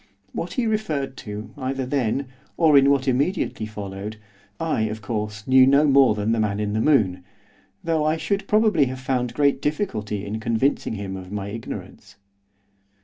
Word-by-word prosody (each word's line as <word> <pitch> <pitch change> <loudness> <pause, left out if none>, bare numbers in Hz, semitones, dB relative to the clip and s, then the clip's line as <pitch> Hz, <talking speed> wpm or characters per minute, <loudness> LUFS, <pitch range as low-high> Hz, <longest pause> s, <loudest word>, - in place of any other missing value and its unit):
What 170 - -4
he 250 - 0
referred 160 -12 -1
to 105 +1 -7
either 135 -1 -2
then, 135 0 0 0.3
or 160 -3 +5
in 140 0 +6
what 140 -1 +2
immediately 135 - 0
followed, 105 0 -6 0.4
I, 165 -8 0
of 110 0 -4
course, 105 -1 -4
knew 130 0 +6
no 140 +2 +5
more 135 -5 +5
than 105 +1 -1
the 115 - +1
man 105 -1 0
in 105 -1 -1
the 110 - 0
moon, 105 -11 +2 0.6
though 165 -2 +1
I 155 +1 +1
should 195 +6 -2
probably 215 -8 +4
have 130 0 -5
found 125 -2 -2
great 140 -2 +2
difficulty 105 - -2
in 105 +2 -4
convincing 115 +1 0
him 100 -2 -5
of 95 0 -9
my 100 -1 -4
ignorance. 115 +2 -8
130 Hz, 170 wpm, -23 LUFS, 105-145 Hz, 0.6 s, in